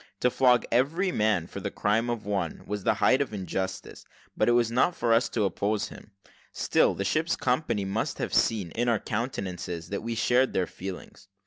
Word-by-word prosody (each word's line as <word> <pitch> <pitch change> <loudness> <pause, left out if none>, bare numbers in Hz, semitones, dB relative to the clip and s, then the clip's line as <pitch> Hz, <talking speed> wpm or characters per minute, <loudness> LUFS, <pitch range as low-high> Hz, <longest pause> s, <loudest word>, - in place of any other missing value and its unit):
To 125 - +3
flog 125 -1 +4
every 160 +11 +2
man 105 - +1
for - - -8
the - - -3
crime 110 +3 0
of 120 -3 -3
one, 95 -5 -2
was 105 -1 -4
the - - +2
height 130 - +3
of 130 -6 -2
injustice, 95 0 -4 0.3
but - - +2
it - - +4
was 120 -1 +2
not 130 +9 +2
for 115 -1 +1
us 115 +2 +3
to 110 - 0
oppose 100 +2 -1
him; - - -13 0.4
still - - +2
the 100 - -3
ship's 160 - +1
company 125 -6 0
must 100 +3 -2
have - - -3
seen, 100 -7 +1
in 120 +5 0
our 115 - +3
countenances, 95 -7 -4
that 100 - -3
we 115 +1 -3
shared 125 +3 +2
their 95 - +1
feelings. 95 +2 -9
110 Hz, 200 wpm, -27 LUFS, 95-125 Hz, 0.4 s, flog